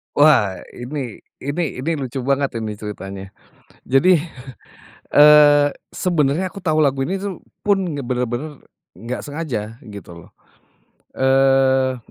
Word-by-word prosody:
Wah 145 -11 +4
ini 125 -2 -6 0.2
ini 145 +6 -2 0.2
ini 160 - -1
lucu 135 -1 -4
banget 135 -2 -1
ini 105 -1 -5
ceritanya. 100 -2 -8 0.5
Jadi, 160 +9 +4 1.0
eee, 145 -1 +7 0.2
sebenarnya 170 0 0
aku 185 +1 -11
tahu 155 -3 +1
lagu 135 -3 +2
ini 190 +6 -2
tuh 195 -3 -6 0.2
pun 190 -7 0
bener-bener 125 +3 -4 0.3
nggak 115 +7 -6
sengaja, 130 -8 -5
gitu 100 -5 -11
loh. 85 - -15 0.9
Eee, 135 -1 +3
135 Hz, 115 wpm, -20 LUFS, 120-150 Hz, 1.0 s, eee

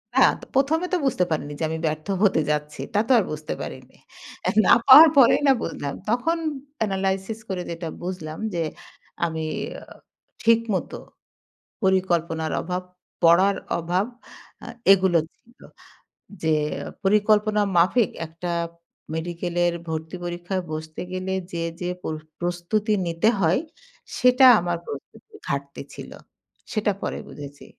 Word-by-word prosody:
না - - +7 0.2
তো - - -10
১ম 280 +4 +3
এ - - -3
তো - - +4
বুঝতে 245 -9 +2
পারিনি 150 -2 -2
যে - - -2
আমি 160 - -2
ব্যর্থ 155 +1 -2 0.2
হতে 190 -6 +4
যাচ্ছি 150 0 -3
তা 205 - +3
তো - - 0
আর - - +1
বুঝতে 155 0 -4
পারিনি। - - -9 0.7
না - - +7
পাওয়ার 305 +5 +11
পরেই 260 0 +6
না 270 - +7
বুঝলাম। 140 -1 -4 0.2
তখন 250 +9 +1 0.4
অ্যানালাইসিস 195 +1 -1
করে 185 -2 -2
যেটা 165 0 -5 0.2
বুঝলাম 160 -4 -5
যে 170 -1 0 0.6
আমি 160 -1 -3 1.0
ঠিক 230 0 +5
মত 185 - -2 0.9
পরিকল্পনার 170 -4 +1
অভাব 180 +1 -3 0.4
পড়ার 185 +4 +5 0.2
অভাব 175 +4 0 0.6
আ - - -8 0.3
এগুলো 190 -3 +4 0.2
ছিল। 235 +2 -27 0.8
যে 160 -1 +3 0.5
পরিকল্পনা 210 +1 +3 0.2
মাফিক 190 +5 +4 0.2
একটা 170 +2 -5 0.6
মেডিকেলের 175 +1 -1 0.2
ভর্তি 160 +2 -4
পরীক্ষায় 175 +2 -3
বসতে 155 0 -6
গেলে 185 +1 -3 0.2
যে, 170 -1 -3 0.2
যে 175 - -2
প্র 160 - -3 0.3
প্রস্তুতি 175 +5 -1
নিতে 170 +6 +2
হয় 175 +2 +3 0.6
সেটা 250 +1 +5
আমার 175 -1 -2
প্রস্তুতির 140 - -10
ঘাটতি 140 0 -4
ছিল। - - -9 0.6
সেটা 215 -1 +1
পরে - - -3
বুঝেছি 145 -1 -10
175 Hz, 130 wpm, -24 LUFS, 160-210 Hz, 1.0 s, পাওয়ার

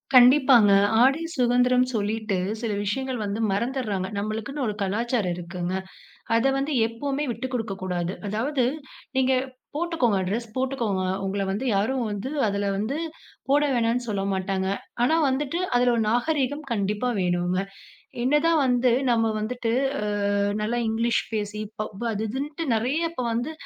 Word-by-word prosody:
கண்டிப்பாங்க. 250 -4 +7 0.3
ஆடை 275 +5 +4 0.2
சுதந்திரம் 250 +1 +3
சொல்லிட்டு, 215 -1 -1 0.2
சில 230 -3 -1
விஷயங்கள் 255 +4 -2
வந்து 205 +2 -3
மறந்துர்றாங்க. 210 -4 -1
நம்பளுக்குன்னு 220 +7 -3
ஒரு 210 - -2
கலாச்சாரம் 210 -1 0
இருக்குதுங்க. 180 +1 -3 0.6
அத 235 - +2
வந்து 280 +2 -1
எப்பவுமே 275 +5 -3
விட்டு 245 +4 -5
கொடுக்க 225 -4 -2
கூடாது. 180 0 -2
அதாவது 250 +4 0 0.5
நீங்க 265 0 +3 0.4
போட்டுக்கோங்க, 300 - +1
ட்ரெஸ் 225 +5 -2
போட்டுக்கோங்க. 245 -8 -1 0.2
உங்கள 195 +1 -1
வந்து 205 +7 -2
யாரும் 250 +6 +1
வந்து 205 +5 -4 0.2
அதுல 200 0 -1
வந்து 220 +9 -2 0.5
போட 285 +2 +5
வேணான்னு 235 +1 +1
சொல்ல 200 -2 -1
மாட்டாங்க. 190 0 -1 0.4
ஆனா, 315 +6 +4
வந்துட்டு 290 +5 -1 0.2
அதில 245 0 +4
ஒரு 225 - +1
நாகரீகம் 285 +3 0
கண்டிப்பா 210 +2 0
வேணுங்க. 180 +1 +1 0.6
என்ன 285 +4 +4
தான் 330 -2 +4
வந்து 245 0 +3 0.2
நம்ப 225 -1 +3
வந்துட்டு 230 +1 -2 0.6
அ - - +1 0.2
நல்லா 230 +3 -1
இங்கிலீஷ் 230 +1 +1
பேசி 210 0 -3 0.2
பப் 215 +1 -5
-அது 215 +1 -2
இதுன்ட்டு 290 +7 -4
நெறைய 280 +9 0
இப்ப 255 -7 -4
வந்து 245 +7 -2
235 Hz, 140 wpm, -25 LUFS, 205-260 Hz, 0.6 s, கண்டிப்பாங்க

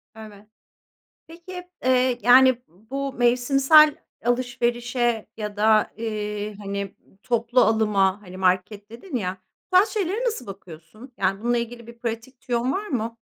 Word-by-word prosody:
Evet. 215 -2 -12 0.8
Peki, 360 +2 -10 0.2
eee, 255 -1 +2
yani, 255 0 +6
bu 265 - -6
mevsimsel 275 +5 +4 0.3
alışverişe 240 -1 -1
ya 210 -1 -5
da, 215 0 +3
eee, 210 -1 -4
hani, 200 -1 -5 0.3
toplu 240 +1 +1
alıma, 210 -3 +2
hani, 185 -2 -11
market 190 +3 -1
dedin 255 +6 -7
ya, 185 -4 -3 0.3
bu - - +5
tarz 395 +4 +6
şeylere 415 +3 -2
nasıl 445 - -3
bakıyorsun? 195 +5 -12
Yani, 195 +1 0
bununla 240 +1 +1
ilgili 235 0 -6
bir 235 0 -13
pratik 235 +2 -6
tüyon 245 -1 -1
var 410 +8 -3
mı? 230 - -3
235 Hz, 135 wpm, -23 LUFS, 210-255 Hz, 0.8 s, yani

